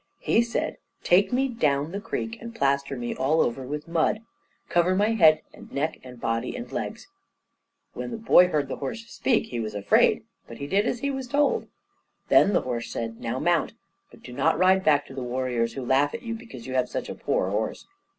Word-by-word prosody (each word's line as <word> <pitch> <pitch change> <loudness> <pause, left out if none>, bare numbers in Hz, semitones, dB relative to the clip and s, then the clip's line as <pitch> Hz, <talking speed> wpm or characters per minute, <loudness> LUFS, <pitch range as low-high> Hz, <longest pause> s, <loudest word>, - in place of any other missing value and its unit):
He 230 - +2
said, 235 0 -2 0.3
"Take 190 +3 +4
me 265 +2 +2
down 150 - 0
the 200 +2 -4
creek, 225 +1 -4
and 230 0 -8
plaster 140 - 0
me 120 -1 -3
all 145 +5 +1
over 120 -1 +1
with 150 +4 -5
mud. 170 +6 +1 0.5
Cover 175 +2 +2
my 205 +3 +2
head 165 -9 +5
and - - -14
neck 155 +3 -2
and 125 -1 -11
body 115 - -2
and 245 -1 -7
legs." - - -5 0.9
When - - -5
the 230 - -5
boy 200 -5 +6
heard 150 -5 0
the 135 - -5
horse 225 - -5
speak, 235 0 0
he 120 - -3
was 110 -2 -4
afraid; 100 0 +3 0.2
but 115 - -10
he 140 - -5
did 200 +9 +1
as 240 - -2
he 280 - 0
was 265 -2 -4
told. 285 +3 +1 0.6
Then 205 - +5
the - - +3
horse 120 -2 -4
said, 115 -1 -4
"Now 115 +2 -2
mount, 170 +3 +1 0.4
but - - -18
do 125 - -9
not - - +2
ride 185 +2 +4
back 145 -3 +3
to - - -12
the 135 - -5
warriors, 125 -2 -1
who 135 -2 -5
laugh 135 +3 +2
at - - -7
you 230 -1 -3
because 225 - -9
you 130 - -5
have 125 -1 +1
such - - -4
a - - -5
poor 95 - -1
horse. 110 +2 -2
150 Hz, 215 wpm, -26 LUFS, -, 0.9 s, boy